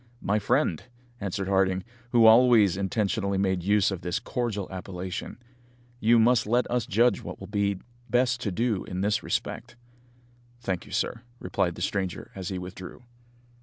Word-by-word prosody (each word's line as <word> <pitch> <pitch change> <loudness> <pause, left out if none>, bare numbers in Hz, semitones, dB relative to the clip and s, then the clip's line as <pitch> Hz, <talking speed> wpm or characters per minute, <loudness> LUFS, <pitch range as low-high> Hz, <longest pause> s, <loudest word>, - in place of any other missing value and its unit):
"My 105 +2 +1
friend," 110 - +1 0.4
answered 95 -1 -3
Harding, 95 -1 +2 0.3
who 120 -2 +5
always 110 -4 +6
intentionally 100 0 -1
made 95 -2 +1
use 100 +2 +2
of 95 -2 -4
this 90 -1 -2
cordial 110 -6 -3
appellation, 95 0 -6 0.6
"you 115 +1 +4
must 115 0 +4
let 120 +3 +2
us 120 -3 0
judge 120 +4 +3
what - - -6
it - - -18
will 95 - -8
be 100 0 0 0.3
best 125 +1 +2
to 105 - -2
do 110 +1 0
in 90 0 -4
this 105 +1 +1
respect." - - -3 0.8
"Thank 95 -7 -3
you, - - -13
sir," 115 - -1 0.2
replied 90 -4 -1
the 90 - -4
stranger 95 -2 -3
as 95 -3 -5
he 95 - -3
withdrew. 90 +4 -9
100 Hz, 165 wpm, -27 LUFS, 95-115 Hz, 0.8 s, always